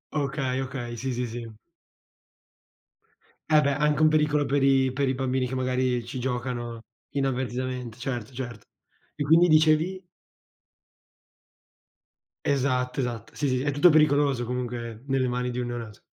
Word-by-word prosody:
Okay, 135 -2 -1
okay, 125 -3 -5
sì, 130 +3 -3
sì, 125 0 -2
sì. 115 -1 -7 2.0
Eh, 155 -1 +6
beh, 140 -1 +1
anche 150 +1 +1
un 155 - +7
pericolo 150 -1 +2
per 140 0 +1
i 135 -1 +3
per 135 0 0
i - - +1
bambini 130 0 -1
che 130 - -4
magari 130 -1 0
ci 130 +2 -6
giocano 120 -2 -3 0.3
inavvertitamente, 130 -3 -2
certo, 125 -2 -4
certo. 120 -5 -7 0.5
E 145 - -2
quindi 165 +4 +5
dicevi? 160 +4 +3 2.4
Esatto, 130 -2 0
esatto, 120 -4 -4
sì, 145 - -1
sì, 130 -1 0
è 145 +2 0
tutto 145 +6 +6
pericoloso 145 -5 +3
comunque 120 -2 -4
nelle 130 -2 +1
mani 125 0 -1
di 125 0 -3
un 120 - -2
neonato. 115 -3 -7
130 Hz, 140 wpm, -26 LUFS, 125-140 Hz, 2.4 s, un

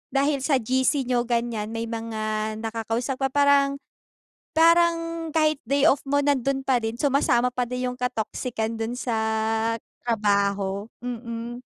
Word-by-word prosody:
dahil 280 +1 +2
sa 275 +2 +1
gc 260 +3 +1
niyo 245 -1 0
gan'yan 235 -3 -1
may 225 - -2
mga 220 -1 -3
nakakausap 230 +3 -2
pa 270 - +3
parang, 280 0 +3 0.8
parang 330 0 +3
kahit 310 -1 +3
day 280 +4 +4
off 275 - +1
mo 285 +1 +1
nandun 275 -1 +1
pa 265 -1 +2
din 225 -2 -1
sumasama 270 -3 +3
pa 250 0 -1
din 250 +1 -3
yung 250 - -8
ka-toxican 230 -2 -2
dun 225 +1 -2
sa 245 -2 -2 0.9
trabaho, 200 -2 +1
mm. 240 0 -6
250 Hz, 140 wpm, -25 LUFS, 225-275 Hz, 0.9 s, day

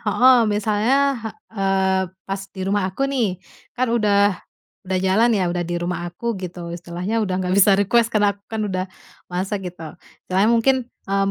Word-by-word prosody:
heeh, 245 +4 +5
misalnya, 210 +4 +1 0.6
eee, 190 -2 +1 0.2
pas 195 0 -4
di 190 - -10
rumah 195 -1 0
aku 200 +9 -2
nih, 245 -9 0 0.4
kan 250 -2 0
udah 205 -3 +3 0.6
udah 185 0 +1
jalan 210 +6 +4
ya, 190 - +1
udah 175 - -2
di 175 - -1
rumah 175 0 -3
aku 235 +7 -3
gitu 175 -2 -6
istilahnya, 175 +6 -3
udah 190 -4 -1
nggak 185 -1 -1
bisa 200 0 +5
request 225 +4 +3
karena 210 -2 +2
aku 200 - -24
kan 220 -1 -3
udah, 185 -2 -2 0.4
masak 190 +1 -3
gitu. 165 -3 -9 0.3
Istilahnya 190 +3 +2
mungkin, 235 +3 +4 0.3
mmm, 195 0 0
195 Hz, 170 wpm, -21 LUFS, 185-220 Hz, 0.6 s, heeh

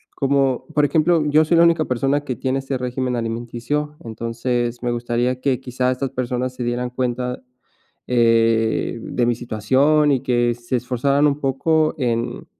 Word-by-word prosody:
como 135 -2 +1
por 150 - +2
ejemplo, 160 +2 +2
yo 150 +1 +4
soy 170 +2 +2
la 170 - +6
única 170 -2 +3
persona 135 +3 0
que 130 -3 -4
tiene 130 +3 -1
este 135 0 -3
régimen 125 0 -2
alimenticio, 120 +6 -3
entonces, 120 +1 -3
me 120 - 0
gustaría 120 +1 -1
que 130 -2 +1
quizá 125 0 -1
estas 130 +1 -2
personas 125 0 -3
se 125 - -4
dieran 120 +1 -2
cuenta, 125 0 -3 0.7
eh, 115 -1 +2
de 120 - -1
mi 120 - +2
situación 130 +7 +2
y 135 -3 +1
que 120 -2 +1
se 120 +1 -4
esforzaran 135 +4 +1
un 145 0 -1
poco 155 +3 +1
en 115 -2 -2
125 Hz, 160 wpm, -21 LUFS, 120-140 Hz, 0.7 s, la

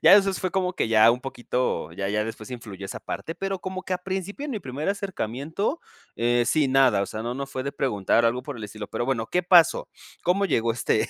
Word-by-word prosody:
Ya - - +8
eso 195 -1 +5
fue 185 0 -2
como 185 -1 0
que 175 - -1
ya 110 0 +7
un 125 - 0
poquito 125 - -2
ya 95 +2 -3
ya 105 +1 0
después 110 +1 -7
influyó 105 -6 -7
esa - - -6
parte, 165 - -5
pero 195 +1 -3
como 185 0 -5
que 185 - -4
a 180 - +1
principio 190 +7 -4
en - - -4
mi 230 - -2
primer 135 +5 -4
acercamiento, 190 - -2 0.4
eh, 120 +1 +2
sí, 155 0 +3
nada, 130 -6 +4
o 100 - -2
sea, 110 +3 -5
no, 120 +1 -3
no 140 +1 -4
fue 130 -1 -4
de 140 +1 -3
preguntar 115 -2 +1
algo 120 +2 +1
por 145 -4 -6
el 110 - -6
estilo, 105 0 -7
pero - - -2
bueno, 120 -3 -1
¿qué 180 +8 0
pasó? 175 -2 +5 0.3
¿Cómo 195 +3 +2
llegó 115 -9 +1
este 115 - +1
130 Hz, 240 wpm, -25 LUFS, 115-185 Hz, 0.4 s, Ya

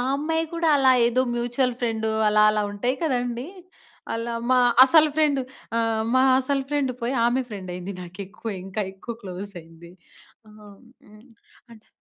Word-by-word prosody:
అమ్మాయి 320 +3 -1
కూడా 335 -1 0
అలా 265 -1 +5 0.2
ఏదో 245 +2 +1
మ్యూచువల్ 240 +1 0
ఫ్రెండు 225 -2 -1 0.2
అలా 210 0 +4
అలా 210 0 0
ఉంటాయి 245 +6 -1
కదండీ! 245 -3 -2 0.7
అలా 230 +1 -3 0.2
మా 255 - +5 0.3
అసలు 310 +2 +5
ఫ్రెండు 300 -3 +2 0.4
ఆహ్, 225 -1 0
మా 260 - +5 0.2
అసలు 275 +1 -1
ఫ్రెండ్ 285 -3 0
పోయి 240 +3 -1
ఆమె 245 +2 +1
ఫ్రెండ్ 195 -4 -8
అయింది. 180 +2 -6
నాకెక్కువ 195 +5 -8
ఇంకా 195 +3 -3
ఎక్కువ 195 +5 -8
క్లోజ్ 190 +1 -7
అయింది. 165 +1 -16 0.6
ఆ! - - -16 0.6
హ్మ్, 215 +2 -18 0.5
అంటే 220 -2 -17
235 Hz, 150 wpm, -24 LUFS, 210-265 Hz, 0.7 s, అలా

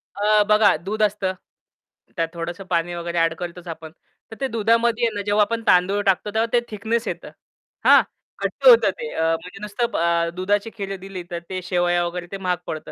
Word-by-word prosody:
अ, 210 +1 +3
बघा 210 -2 +5
दूध 215 +2 -3
असतं 200 -2 0 0.8
त्यात 165 -2 0
थोडंसं 170 +3 -5
पाणी 175 0 0
वगैरे 170 0 -4
ॲड 165 0 +2
करतोच 175 0 -7
आपण, 160 -1 -8 0.4
तर - - -7
ते 270 - +1
दुधामध्ये 230 +1 +2
ना, 205 - -2
जेव्हा 205 0 +3
आपण 230 +1 -3
तांदूळ 185 +3 +4
टाकतो 195 +2 +1
तेव्हा 220 +1 +2
ते 240 - +5
थिकनेस 225 +2 -2
येतं - - -5 0.6
हां, - - +8 0.4
घट्ट - - 0
होतं 475 -2 +8
ते 465 - -4
अ, 160 - -1 0.2
म्हणजे 180 +2 -11
नुसतं 210 +3 -2
अ, 170 0 +1
दुधाची 205 +4 0
खीर 195 -1 -4
दिली 190 -1 -7
तर 170 - -3
ते 185 -1 -4
शेवया 175 -1 +1
वगैरे 175 0 -5
ते 195 - -4
महाग 180 -2 -1
पडतं. 155 -2 -6
195 Hz, 190 wpm, -22 LUFS, 175-215 Hz, 0.8 s, हां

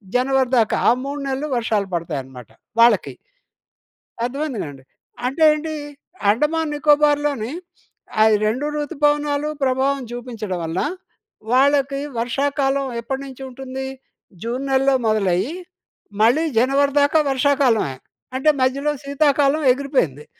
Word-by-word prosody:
జనవరి 260 0 +2
దాకా 220 -2 +2
ఆ 235 - +6
3 280 +1 -4
నెల్లు 270 +3 -2
వర్షాలు 215 -4 0
పడతాయనమాట, 135 -7 -5 0.3
వాళ్ళకి. 210 - +4 1.1
అర్థమైంది 275 0 -3
కదండి. 140 -3 -9 0.4
అంటే 275 +5 -2
ఏంటి, 310 +1 -3 0.6
అండమాన్ 300 +7 0
నికోబార్లోని, 290 -4 +2 0.7
ఆయి 220 0 +5
2 240 +7 0
ఋతుపవనాలు 295 -1 0
ప్రభావం 270 +1 +1
చూపించడం 230 -6 -5
వలన, 165 +3 -2 0.7
వాళ్ళకి 275 +1 +3 0.2
వర్షాకాలం 275 +3 0
ఎప్పటి 265 +3 -4
నుంచి 270 0 -10
ఉంటుంది, 265 +1 -6 0.6
జూన్ 255 +4 -3
నెలలో 270 0 +3
మొదలయ్యీ, 205 - +1 0.7
మళ్ళీ 250 +9 +4
జనవరి 275 +3 +2
దాకా 290 +2 +3
వర్షాకాలమే. 260 - +2 0.4
అంటే, 305 +3 +3
మధ్యలో 275 +3 +1
శీతాకాలం 285 +1 +2
ఎగిరిపోయింది. 250 - -1
270 Hz, 105 wpm, -21 LUFS, 230-285 Hz, 1.1 s, ఆ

